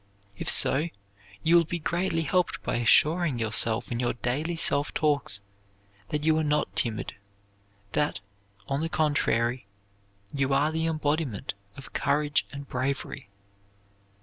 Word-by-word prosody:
If -, -, -3 dB
so, 150 Hz, +5 st, +5 dB, 0.6 s
you 165 Hz, +1 st, +4 dB
will 170 Hz, -, +6 dB
be 170 Hz, +2 st, -3 dB
greatly 170 Hz, 0 st, -1 dB
helped 180 Hz, +4 st, 0 dB
by -, -, -1 dB
assuring 150 Hz, +5 st, +4 dB
yourself 110 Hz, +1 st, +1 dB
in 120 Hz, -, -2 dB
your 120 Hz, -1 st, 0 dB
daily 140 Hz, +8 st, -2 dB
self 145 Hz, -3 st, +2 dB
talks 145 Hz, -9 st, 0 dB, 0.7 s
that 150 Hz, 0 st, -2 dB
you 160 Hz, 0 st, +3 dB
are -, -, 0 dB
not 150 Hz, 0 st, 0 dB
timid; 110 Hz, -3 st, 0 dB, 0.8 s
that, 150 Hz, +5 st, 0 dB, 0.5 s
on 140 Hz, +2 st, -1 dB
the 165 Hz, -, -1 dB
contrary, 125 Hz, -7 st, 0 dB, 0.7 s
you 135 Hz, -1 st, +1 dB
are 145 Hz, +3 st, +2 dB
the 160 Hz, +1 st, -1 dB
embodiment 150 Hz, -6 st, -1 dB, 0.2 s
of 135 Hz, -, -11 dB
courage 145 Hz, +1 st, 0 dB
and 140 Hz, 0 st, -8 dB
bravery. 130 Hz, -2 st, -3 dB
145 Hz, 135 wpm, -27 LUFS, 125-160 Hz, 0.8 s, will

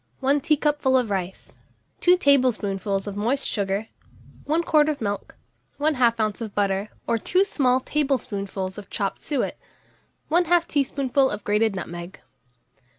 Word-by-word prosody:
1 280 Hz, +2 st, +2 dB
teacupful 295 Hz, -3 st, +2 dB
of 240 Hz, -5 st, 0 dB
rice, 190 Hz, -1 st, -4 dB, 0.5 s
2 360 Hz, +1 st, +5 dB
tablespoonfuls 210 Hz, -, +1 dB
of 205 Hz, -1 st, -5 dB
moist 240 Hz, +7 st, 0 dB
sugar, 200 Hz, +1 st, -1 dB, 0.6 s
1 320 Hz, +3 st, +1 dB
quart 305 Hz, -2 st, +3 dB
of 300 Hz, -, -2 dB
milk, 205 Hz, -2 st, -4 dB, 0.4 s
1/2 255 Hz, -6 st, +2 dB
oz. 215 Hz, 0 st, -1 dB
of 220 Hz, -3 st, -6 dB
butter 200 Hz, 0 st, 0 dB, 0.2 s
or 230 Hz, -1 st, 0 dB
2 365 Hz, -, +3 dB
small 260 Hz, -9 st, +2 dB
tablespoonfuls 205 Hz, -10 st, -2 dB
of 205 Hz, -, -12 dB
chopped 195 Hz, -3 st, -3 dB
suet, 285 Hz, -5 st, -2 dB, 0.7 s
1/2 345 Hz, 0 st, +3 dB
teaspoonful 275 Hz, -2 st, +1 dB
of 210 Hz, 0 st, -5 dB
grated 210 Hz, 0 st, +1 dB
nutmeg. 175 Hz, 0 st, -7 dB
240 Hz, 135 wpm, -24 LUFS, 200-285 Hz, 0.7 s, 2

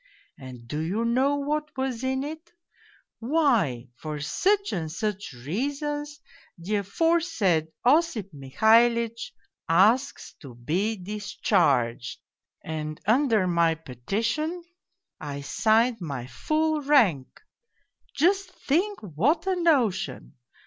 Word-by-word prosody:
And 125 Hz, -3 st, -11 dB
do 150 Hz, +5 st, -4 dB
you 190 Hz, +9 st, -1 dB
know 260 Hz, +5 st, +2 dB
what 300 Hz, +1 st, -3 dB
was 260 Hz, -2 st, -2 dB
in 265 Hz, +1 st, -1 dB
it? 315 Hz, +3 st, -8 dB, 0.7 s
Why, 230 Hz, -, +1 dB
' -, -, -51 dB
for 155 Hz, -1 st, -5 dB
such 400 Hz, -, 0 dB
and 160 Hz, -3 st, -3 dB
such 205 Hz, +2 st, -3 dB
reasons 285 Hz, -, -4 dB, 0.4 s
the 190 Hz, +5 st, -2 dB
aforesaid 215 Hz, -, +1 dB, 0.2 s
()>ip 250 Hz, -, +2 dB
Mihalitch 230 Hz, -, +2 dB, 0.4 s
asks 215 Hz, +11 st, +2 dB
to 130 Hz, -5 st, -11 dB
be 180 Hz, -, -1 dB
discharged,' 180 Hz, -, 0 dB, 0.5 s
and 155 Hz, -1 st, -5 dB
under 225 Hz, -3 st, +3 dB
my 170 Hz, -2 st, +2 dB
petition 220 Hz, -, -3 dB, 0.6 s
I 140 Hz, -1 st, -6 dB
signed 225 Hz, -, +2 dB
my 140 Hz, -7 st, -5 dB
full 310 Hz, -, -1 dB
rank! 230 Hz, -, +2 dB, 0.8 s
Just 370 Hz, +6 st, +2 dB, 0.2 s
think 375 Hz, +8 st, +1 dB
what 230 Hz, -, 0 dB
a 380 Hz, -1 st, +1 dB
notion! 260 Hz, -, 0 dB
225 Hz, 105 wpm, -26 LUFS, -, 0.8 s, under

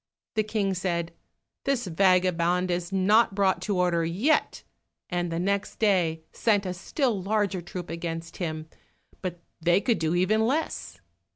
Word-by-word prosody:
The 220 Hz, -, +2 dB
King 210 Hz, -2 st, -1 dB
said, 170 Hz, -2 st, -2 dB, 0.5 s
"This 270 Hz, -4 st, 0 dB
vagabond 180 Hz, 0 st, +2 dB
is 175 Hz, 0 st, -2 dB
not 195 Hz, +2 st, +4 dB
brought 195 Hz, -2 st, +2 dB
to 205 Hz, -3 st, -1 dB
order 175 Hz, -2 st, +2 dB
yet," 200 Hz, -, +1 dB, 0.5 s
and 175 Hz, -1 st, -1 dB, 0.2 s
next 200 Hz, 0 st, -1 dB
day 175 Hz, -7 st, +2 dB
sent 205 Hz, -3 st, +1 dB
a 185 Hz, -, -2 dB
still 220 Hz, -, -1 dB
larger 200 Hz, -1 st, 0 dB
troop 175 Hz, -1 st, -7 dB
against 165 Hz, 0 st, -5 dB
him, 155 Hz, -3 st, -4 dB, 0.5 s
but 175 Hz, -2 st, -5 dB, 0.2 s
they 175 Hz, +3 st, +4 dB
could 235 Hz, +1 st, +1 dB
do 160 Hz, +1 st, 0 dB
even 215 Hz, +5 st, +3 dB
less. 255 Hz, -, -2 dB
185 Hz, 145 wpm, -27 LUFS, 170-205 Hz, 0.5 s, not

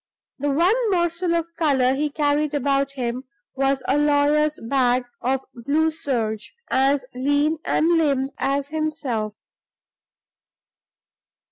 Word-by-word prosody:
The 290 Hz, +2 st, -1 dB
one 335 Hz, +8 st, +3 dB, 0.2 s
morsel 345 Hz, -1 st, 0 dB
of 335 Hz, -1 st, 0 dB
color 265 Hz, -5 st, +3 dB
he 295 Hz, +2 st, -1 dB
carried 295 Hz, 0 st, 0 dB
about 275 Hz, 0 st, 0 dB
him 250 Hz, 0 st, -3 dB, 0.3 s
was 270 Hz, 0 st, 0 dB
a 280 Hz, +3 st, +2 dB
lawyer's 295 Hz, +1 st, +2 dB
bag 250 Hz, 0 st, +1 dB, 0.2 s
of 265 Hz, +2 st, 0 dB
blue 290 Hz, +7 st, 0 dB
serge, 230 Hz, -9 st, -3 dB, 0.2 s
as 270 Hz, 0 st, +2 dB
lean 290 Hz, +4 st, +1 dB
and 315 Hz, -, +2 dB
limp 275 Hz, -3 st, +1 dB
as 275 Hz, +1 st, -1 dB
himself. 295 Hz, -9 st, -2 dB
280 Hz, 115 wpm, -22 LUFS, 260-305 Hz, 0.3 s, one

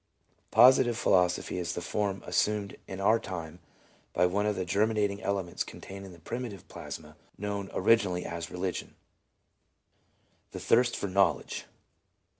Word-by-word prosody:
Positive 120 Hz, 0 st, +6 dB
philosophy 90 Hz, -3 st, +2 dB
is 90 Hz, 0 st, -2 dB
the -, -, -3 dB
form 100 Hz, +2 st, -2 dB
assumed 105 Hz, -2 st, 0 dB
in 95 Hz, -, -6 dB
our 110 Hz, +4 st, +4 dB
time 85 Hz, -6 st, -6 dB, 0.5 s
by 90 Hz, -, +3 dB
one 100 Hz, +4 st, +1 dB
of 105 Hz, -, +1 dB
the 95 Hz, -, -2 dB
germinating 105 Hz, +1 st, +1 dB
elements 95 Hz, -4 st, -1 dB
contained 95 Hz, 0 st, -9 dB
in -, -, -11 dB
the 85 Hz, -, -13 dB
primitive 100 Hz, +1 st, -6 dB
plasma 75 Hz, -1 st, -8 dB, 0.2 s
known 100 Hz, -1 st, -3 dB
originally 95 Hz, -3 st, +2 dB
as 85 Hz, 0 st, -5 dB
Religion; 90 Hz, 0 st, -4 dB, 1.6 s
the -, -, -5 dB
thirst 120 Hz, +1 st, +3 dB
for -, -, -2 dB
knowledge. 95 Hz, -4 st, +1 dB
95 Hz, 135 wpm, -29 LUFS, 90-105 Hz, 1.6 s, Positive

